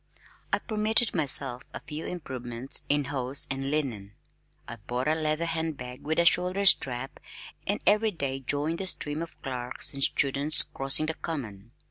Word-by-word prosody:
I -, -, +2 dB
permitted 220 Hz, +1 st, +2 dB
myself 135 Hz, -5 st, +2 dB
a -, -, -5 dB
few 150 Hz, +2 st, -8 dB
improvements 130 Hz, -6 st, -1 dB
in 145 Hz, 0 st, +2 dB
hose 135 Hz, -1 st, -3 dB
and 135 Hz, 0 st, -3 dB
linen. 120 Hz, -10 st, -3 dB, 0.5 s
I 120 Hz, -, -8 dB
bought 125 Hz, +5 st, -4 dB
a 155 Hz, -, +3 dB
leather 155 Hz, +1 st, -1 dB
hand 160 Hz, -2 st, -3 dB
bag 125 Hz, -1 st, -9 dB
with 160 Hz, +2 st, -3 dB
a 170 Hz, -, +3 dB
shoulder 180 Hz, +3 st, +2 dB
strap, 135 Hz, -5 st, +4 dB, 0.5 s
and 205 Hz, -, -1 dB
every 215 Hz, +2 st, +3 dB
day 140 Hz, -8 st, -4 dB
joined 145 Hz, +5 st, -2 dB
the 190 Hz, -, -2 dB
stream 150 Hz, -3 st, -3 dB
of 170 Hz, -, -9 dB
clerks 125 Hz, 0 st, -1 dB
and 140 Hz, -, -7 dB
students 140 Hz, +3 st, +4 dB
crossing 135 Hz, +3 st, +1 dB
the 160 Hz, -, -2 dB
Common. 115 Hz, -12 st, -7 dB
145 Hz, 165 wpm, -27 LUFS, 130-165 Hz, 0.5 s, strap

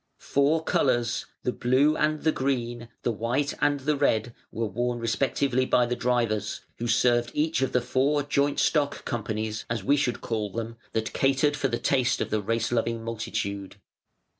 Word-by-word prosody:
Four 150 Hz, +3 st, +1 dB
colours, 120 Hz, -6 st, +1 dB, 0.2 s
the 125 Hz, -, +1 dB
Blue 130 Hz, +6 st, +3 dB
and 155 Hz, 0 st, 0 dB
the 160 Hz, -, +4 dB
Green, 120 Hz, -4 st, -2 dB
the 120 Hz, -, +1 dB
White 120 Hz, +6 st, -1 dB
and 145 Hz, -1 st, +2 dB
the 150 Hz, +3 st, +1 dB
Red, 120 Hz, -5 st, +1 dB, 0.2 s
were 115 Hz, -, -2 dB
worn 120 Hz, +4 st, -1 dB
respectively 130 Hz, +2 st, +1 dB
by 125 Hz, -1 st, +3 dB
the 125 Hz, +1 st, -1 dB
drivers, 115 Hz, -4 st, 0 dB, 0.2 s
who 120 Hz, -, -2 dB
served 120 Hz, +1 st, +3 dB
each 155 Hz, -1 st, +1 dB
of 135 Hz, -, +1 dB
the 125 Hz, -, +2 dB
four 145 Hz, +4 st, +1 dB
joint 140 Hz, 0 st, +1 dB
stock 145 Hz, -3 st, +1 dB
companies 110 Hz, -1 st, -3 dB
(as 115 Hz, -4 st, -2 dB
we 140 Hz, +6 st, +4 dB
should 125 Hz, -4 st, 0 dB
call 110 Hz, -3 st, -2 dB
them) 115 Hz, +3 st, -5 dB, 0.2 s
that 110 Hz, -1 st, -2 dB
catered 135 Hz, +2 st, +2 dB
for 145 Hz, -2 st, 0 dB
the 120 Hz, -2 st, -1 dB
taste 130 Hz, -2 st, +1 dB
of -, -, -2 dB
the 110 Hz, 0 st, +1 dB
race 115 Hz, +3 st, -1 dB
loving 115 Hz, -1 st, 0 dB
multitude. 100 Hz, -4 st, -4 dB
120 Hz, 175 wpm, -26 LUFS, 115-140 Hz, 0.2 s, the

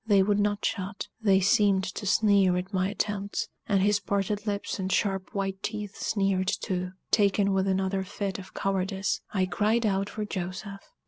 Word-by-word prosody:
They 200 Hz, -3 st, +5 dB
would 205 Hz, +1 st, +2 dB
not 205 Hz, 0 st, 0 dB
shut 200 Hz, -1 st, -3 dB
they 195 Hz, -3 st, +4 dB
seemed 195 Hz, 0 st, +3 dB
to 200 Hz, +2 st, -5 dB
sneer 200 Hz, -3 st, +4 dB
at 185 Hz, +3 st, -4 dB
my 185 Hz, 0 st, +1 dB
attempts, 205 Hz, +1 st, -2 dB, 0.2 s
and 195 Hz, -3 st, +2 dB
his 205 Hz, 0 st, +3 dB
parted 205 Hz, +1 st, -2 dB
lips 200 Hz, 0 st, -2 dB
and 190 Hz, 0 st, -2 dB
sharp 195 Hz, -2 st, 0 dB
white 195 Hz, -1 st, -2 dB
teeth 210 Hz, -2 st, -4 dB
sneered 195 Hz, -2 st, 0 dB
too! 185 Hz, -2 st, -2 dB, 0.2 s
Taken 200 Hz, -1 st, +3 dB
with 190 Hz, 0 st, +1 dB
another 190 Hz, 0 st, 0 dB
fit 195 Hz, 0 st, -4 dB
of 190 Hz, -, -12 dB
cowardice, 195 Hz, 0 st, -1 dB
I 190 Hz, -2 st, +1 dB
cried 215 Hz, +5 st, +1 dB
out 195 Hz, -1 st, +1 dB
for 215 Hz, -1 st, -4 dB
Joseph. 195 Hz, +1 st, -5 dB
195 Hz, 175 wpm, -28 LUFS, 190-205 Hz, 0.2 s, They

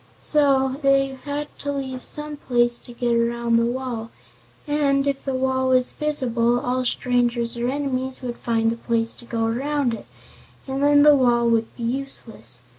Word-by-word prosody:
So 270 Hz, -3 st, +2 dB
they 275 Hz, -1 st, +2 dB
had 290 Hz, +1 st, -3 dB
to 285 Hz, -, -3 dB
leave 265 Hz, -2 st, -4 dB
some 300 Hz, 0 st, -2 dB
place 240 Hz, -3 st, +2 dB
to 245 Hz, -, -11 dB
get 240 Hz, 0 st, -1 dB
around 235 Hz, 0 st, +1 dB
the 230 Hz, 0 st, +2 dB
wall, 240 Hz, -2 st, -4 dB, 0.6 s
and, 280 Hz, -2 st, +2 dB
if 280 Hz, -1 st, -1 dB
the 270 Hz, -1 st, -2 dB
wall 260 Hz, 0 st, 0 dB
was 255 Hz, -1 st, +3 dB
visible, 245 Hz, -6 st, +1 dB
all 255 Hz, +1 st, -1 dB
strangers 240 Hz, -1 st, +1 dB
or 235 Hz, +1 st, -2 dB
enemies 265 Hz, -2 st, -3 dB
would 240 Hz, -1 st, -4 dB
find 225 Hz, -1 st, 0 dB
the 230 Hz, -, -4 dB
place 230 Hz, -1 st, 0 dB
to 240 Hz, -, -11 dB
go 230 Hz, -1 st, -1 dB
around 265 Hz, +2 st, 0 dB
it 225 Hz, -, -8 dB, 0.6 s
and 270 Hz, 0 st, -3 dB
then 290 Hz, 0 st, +5 dB
the 295 Hz, -1 st, +7 dB
wall 240 Hz, -3 st, +3 dB
would 225 Hz, -1 st, +2 dB
be 235 Hz, -, -6 dB
useless. 230 Hz, -, -4 dB
255 Hz, 175 wpm, -23 LUFS, 235-275 Hz, 0.6 s, the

